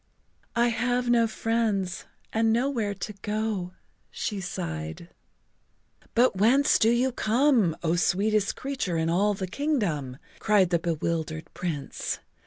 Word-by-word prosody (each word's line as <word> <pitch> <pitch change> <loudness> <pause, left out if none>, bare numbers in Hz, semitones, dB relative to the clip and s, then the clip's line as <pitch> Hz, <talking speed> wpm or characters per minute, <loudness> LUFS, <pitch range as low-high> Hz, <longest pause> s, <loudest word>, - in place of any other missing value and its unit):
"I 240 +1 +3
have 245 +1 0
no 230 -1 +4
friends 220 -5 -1 0.3
and 225 0 +3
nowhere 230 -4 0
to 210 +2 -5
go," 210 -4 -2 0.4
she 205 -3 -3
sighed. 80 - -5 1.1
"But 240 -3 +4
whence 260 +8 +4
do 220 - +4
you 245 +3 +2
come, 235 - +2
O 165 0 +2
sweetest 205 +4 +1
creature 260 -11 -3
in 160 0 0
all 205 +4 +2
the 190 - -3
kingdom?" 185 - -1 0.2
cried 200 -4 +3
the 170 - +3
bewildered 160 -1 -3
Prince. 150 -6 -3
210 Hz, 125 wpm, -27 LUFS, 175-235 Hz, 1.1 s, no